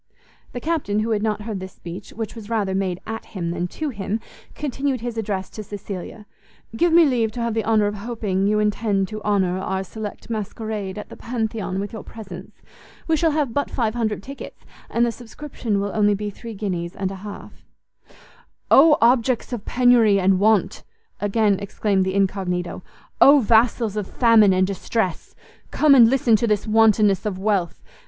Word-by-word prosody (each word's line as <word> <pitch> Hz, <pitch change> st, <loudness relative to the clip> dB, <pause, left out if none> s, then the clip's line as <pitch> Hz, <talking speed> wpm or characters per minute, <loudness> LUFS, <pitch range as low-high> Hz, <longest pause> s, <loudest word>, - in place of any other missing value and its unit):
The 245 Hz, -, -4 dB
Captain, 275 Hz, -9 st, -1 dB
who 225 Hz, +1 st, -2 dB
had 210 Hz, -2 st, +1 dB
not 210 Hz, -1 st, -1 dB
heard 210 Hz, -3 st, -4 dB
this 190 Hz, 0 st, -8 dB
speech, 175 Hz, +3 st, -9 dB
which 225 Hz, -1 st, -6 dB
was 225 Hz, -2 st, -10 dB
rather 210 Hz, -4 st, 0 dB
made 190 Hz, -2 st, -1 dB
at 225 Hz, 0 st, -5 dB
him 170 Hz, -2 st, -2 dB
than 175 Hz, +1 st, -2 dB
to 310 Hz, -, -4 dB
him, 210 Hz, -2 st, -3 dB, 0.4 s
continued 275 Hz, -3 st, -2 dB
his 240 Hz, -1 st, -4 dB
address 200 Hz, -4 st, -3 dB
to 215 Hz, -, -7 dB
Cecilia; 205 Hz, 0 st, -8 dB, 0.5 s
"Give 345 Hz, +8 st, +2 dB
me 335 Hz, 0 st, +7 dB
leave 235 Hz, -6 st, +1 dB
to 245 Hz, -, -6 dB
have 235 Hz, -1 st, -1 dB
the 225 Hz, 0 st, 0 dB
honour 220 Hz, -2 st, +2 dB
of 205 Hz, -, -1 dB
hoping 205 Hz, -3 st, -2 dB
you 210 Hz, +1 st, +2 dB
intend 210 Hz, -2 st, 0 dB
to 215 Hz, -1 st, -6 dB
honour 190 Hz, -3 st, +1 dB
our 190 Hz, 0 st, -2 dB
select 210 Hz, +2 st, -8 dB
masquerade 215 Hz, -2 st, -4 dB
at 210 Hz, -, -7 dB
the -, -, -10 dB
Pantheon 220 Hz, -5 st, -3 dB
with 200 Hz, +2 st, -5 dB
your 220 Hz, -, -6 dB
presence. 195 Hz, -5 st, -11 dB, 0.4 s
We 325 Hz, -, +3 dB
shall 325 Hz, +1 st, +2 dB
have 295 Hz, -6 st, -1 dB
but 285 Hz, -, -1 dB
five 225 Hz, -4 st, -1 dB
hundred 215 Hz, -4 st, -2 dB
tickets, 275 Hz, +4 st, -10 dB, 0.2 s
and 235 Hz, +1 st, +2 dB
the 235 Hz, -, 0 dB
subscription 235 Hz, -3 st, -4 dB
will 200 Hz, 0 st, -2 dB
only 205 Hz, -1 st, +3 dB
be 205 Hz, +1 st, -4 dB
three 230 Hz, +2 st, -9 dB
guineas 180 Hz, -4 st, -4 dB
and 190 Hz, -1 st, -3 dB
a -, -, -6 dB
half." 205 Hz, 0 st, -10 dB, 1.1 s
"Oh 300 Hz, +2 st, +7 dB
objects 245 Hz, +1 st, +2 dB
of 220 Hz, -4 st, -5 dB
penury 240 Hz, -5 st, +4 dB
and 190 Hz, 0 st, +3 dB
want!" 215 Hz, -1 st, +2 dB, 0.4 s
again 205 Hz, -1 st, +1 dB
exclaimed 200 Hz, -1 st, 0 dB
the 190 Hz, 0 st, -2 dB
incognito; 185 Hz, -3 st, -1 dB, 0.4 s
"Oh 285 Hz, +1 st, +8 dB
vassals 225 Hz, -2 st, +2 dB
of 210 Hz, -2 st, -3 dB
famine 225 Hz, -4 st, +5 dB
and 185 Hz, 0 st, +3 dB
distress! 195 Hz, -1 st, -3 dB, 0.3 s
Come 300 Hz, -2 st, +4 dB
and 235 Hz, -4 st, +8 dB
listen 245 Hz, -3 st, +3 dB
to 235 Hz, -, 0 dB
this 210 Hz, -2 st, +1 dB
wantonness 215 Hz, -2 st, +4 dB
of 210 Hz, -4 st, -3 dB
wealth! 190 Hz, -3 st, -1 dB
215 Hz, 185 wpm, -22 LUFS, 195-230 Hz, 1.1 s, Oh